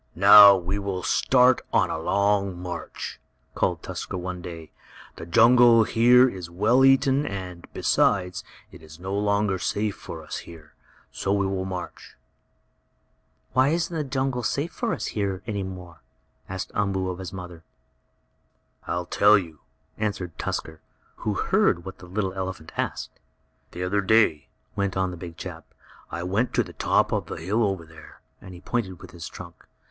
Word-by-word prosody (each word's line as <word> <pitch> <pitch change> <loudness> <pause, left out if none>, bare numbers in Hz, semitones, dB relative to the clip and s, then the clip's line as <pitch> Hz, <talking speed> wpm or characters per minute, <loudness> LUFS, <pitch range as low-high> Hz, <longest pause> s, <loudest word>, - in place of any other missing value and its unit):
"Now 100 +2 +9
we 95 +2 -3
will 95 -2 -4
start 125 0 +3
on - - +2
a - - -3
long 100 +1 +1
march!" 90 -2 -6 0.3
called - - -1
Tusker - - -5
one 90 0 -5
day. 80 -3 -9 0.5
"The 80 - -8
jungle 115 +3 +6
here 125 +3 +5
is 90 -7 -6
well 110 +9 +3
eaten, 135 +1 +4
and, 90 -7 -6
besides, 90 -3 +1 0.3
it - - -14
is 80 +1 -14
no 95 +2 -5
longer 100 -1 +1
safe 105 +2 -1
for 80 -1 -9
us 75 - -6
here. 80 -3 -12 0.4
So 100 - -3
we 100 -1 +1
will 95 -1 -2
march." 90 -2 -7 1.4
"Why 130 +1 +4
isn't 170 +2 -1
the 155 - -1
jungle 130 -2 -2
safe 145 +7 -3 0.3
here 100 -3 -2
any 105 -3 -3
more?" 90 -3 -9 0.5
asked 95 -1 -5
Umboo 95 -2 -1
of 90 - -8
his 95 - -6
mother. 90 -3 -9 1.2
"I'll 90 0 -2
tell 105 +4 +5
you," 80 -6 -6 0.4
answered 95 -6 -3
Tusker, 80 -1 -4 0.4
who - - -2
heard 85 - +1
what 95 - -9
the 90 - -12
little 95 0 -2
elephant 95 -4 -6
asked. - - -4 0.5
"The 90 - -6
other 100 +3 0
day," 100 -7 +3 0.3
went 100 -1 -1
on 95 -1 0
the - - -7
big 85 -1 -9
chap, - - -9 0.4
"I 85 +1 -4
went 100 +7 -1
to - - +3
the - - -12
top - - +1
of - - -1
the - - -5
hill 100 +8 -1
over 95 -5 -1
there," 80 0 -15 0.2
and 95 -1 -11
he 85 - -13
pointed 95 -8 -3
with - - -12
his 85 -1 -8
trunk. 85 -2 -12
95 Hz, 165 wpm, -25 LUFS, 90-105 Hz, 1.4 s, Now